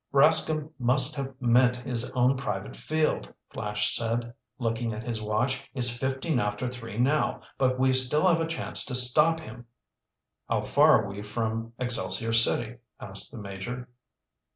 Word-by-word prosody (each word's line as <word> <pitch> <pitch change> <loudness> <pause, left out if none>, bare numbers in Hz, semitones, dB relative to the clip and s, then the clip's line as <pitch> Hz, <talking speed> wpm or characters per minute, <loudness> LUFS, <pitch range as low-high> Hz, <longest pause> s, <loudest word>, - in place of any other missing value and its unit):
"Rascomb 155 +2 +4
must 135 +5 +3
have 135 -2 -5
meant 125 0 +4
his 125 -1 -3
own 125 +1 +3
private 135 - -4
field," 155 0 -1 0.2
Flash 105 0 -1
said, 115 +1 -2 0.2
looking 115 -1 -2
at 110 +1 -6
his 115 -2 -4
watch. 120 +5 -1
"It's 120 -2 0
fifteen 130 +3 -1
after 105 +3 -2
three 115 -4 -7
now. 140 +5 +1 0.2
But 130 -1 +2
we 130 0 +3
still 130 +6 +2
have 165 -2 +3
a 165 - -1
chance 165 0 -2
to 130 - -4
stop 150 +6 +4
him." 120 -6 -11 0.8
"How - - 0
far 110 - +5
are - - -5
we 100 +1 -7
from 115 +2 -3
Excelsior 120 -2 0
City?" 115 +1 +2 0.2
asked 100 0 -2
the - - -9
Major. 110 +6 -7
125 Hz, 155 wpm, -27 LUFS, 115-135 Hz, 0.8 s, far